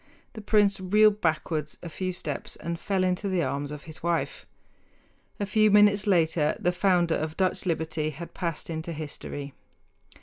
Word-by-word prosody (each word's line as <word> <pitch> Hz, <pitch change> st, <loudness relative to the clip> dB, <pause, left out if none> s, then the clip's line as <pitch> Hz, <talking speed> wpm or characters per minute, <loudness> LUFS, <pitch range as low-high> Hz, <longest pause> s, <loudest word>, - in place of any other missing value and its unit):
The 220 Hz, -, -8 dB
prince 205 Hz, -2 st, +3 dB
reeled 210 Hz, +3 st, +4 dB
backward 155 Hz, -2 st, 0 dB
a -, -, -5 dB
few 185 Hz, +3 st, -3 dB
steps 155 Hz, -6 st, -5 dB
and 170 Hz, 0 st, -5 dB
fell 195 Hz, -1 st, 0 dB
into 185 Hz, +2 st, 0 dB
the 185 Hz, -3 st, +1 dB
arms 140 Hz, +2 st, -2 dB
of 150 Hz, 0 st, -7 dB
his 155 Hz, 0 st, -10 dB
wife. 165 Hz, -5 st, -2 dB, 0.9 s
A 205 Hz, -, 0 dB
few 215 Hz, +1 st, +3 dB
minutes 205 Hz, 0 st, +5 dB
later 160 Hz, -5 st, +2 dB
the 180 Hz, -, +2 dB
founder 180 Hz, -2 st, +2 dB
of 155 Hz, 0 st, -3 dB
Dutch 185 Hz, 0 st, 0 dB
liberty 160 Hz, -2 st, -1 dB
had 165 Hz, +3 st, -8 dB
passed 170 Hz, -2 st, -4 dB
into 160 Hz, +1 st, -4 dB
history. 145 Hz, -2 st, -6 dB
170 Hz, 165 wpm, -27 LUFS, 155-195 Hz, 0.9 s, minutes